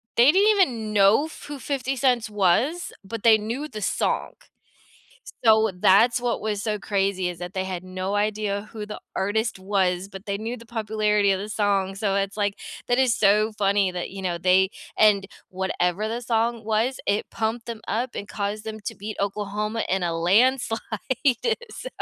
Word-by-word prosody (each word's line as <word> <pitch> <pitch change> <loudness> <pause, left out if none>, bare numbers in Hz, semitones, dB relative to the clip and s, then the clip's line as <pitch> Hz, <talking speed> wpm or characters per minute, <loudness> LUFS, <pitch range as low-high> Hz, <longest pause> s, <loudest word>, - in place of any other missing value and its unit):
they 245 +5 +7
didn't 395 +5 +4
even 245 - +2
know 205 +8 +5
who 290 -2 -9
50 270 -1 -2
Cent 245 -3 +1
was, 215 - +1
but 225 +2 -6
they 225 -2 +7
knew 235 +8 -4
the 215 -6 -8
song. - - -1 1.1
So, 220 -1 +5
that's 200 +7 +4
what 245 -1 -1
was 210 -1 -2
so 210 -3 -1
crazy, 195 -2 0
is 175 - -6
that 175 +2 -7
they 190 0 -1
had 185 -1 -5
no 185 +2 -3
idea 205 -1 -1
who 215 -2 -5
the 210 - -7
artist 220 +4 0
was, 190 -1 0
but 195 +1 -11
they 200 - -1
knew 225 +4 -4
the 230 -1 -14
popularity 215 -2 +1
of 190 - +2
the 205 +2 -5
song, 200 -2 0
so, 195 -1 -1
it's 195 +1 -1
like, 205 -1 -1 0.3
that 245 0 +2
is 255 -3 +3
so 210 +2 +3
funny 200 -2 +1
that, 180 -1 -4
you 195 - -7
know, 180 -2 -2
they 185 +2 +3 0.3
and 200 -2 +4 0.2
whatever 190 +1 -1
the 235 +2 -4
song 230 0 0
was, 225 +4 0
it 205 +1 0
pumped 225 +1 -2
them 230 -2 -6
up, 240 +3 -2
and 205 - -5
caused 205 +1 -4
them 220 0 -6
to 205 - -6
beat 210 +1 -6
Oklahoma 210 +2 -2
in 190 0 0
a 170 -1 0
landslide. 225 +6 +3 0.9
So - - -7
210 Hz, 185 wpm, -24 LUFS, 195-230 Hz, 1.1 s, they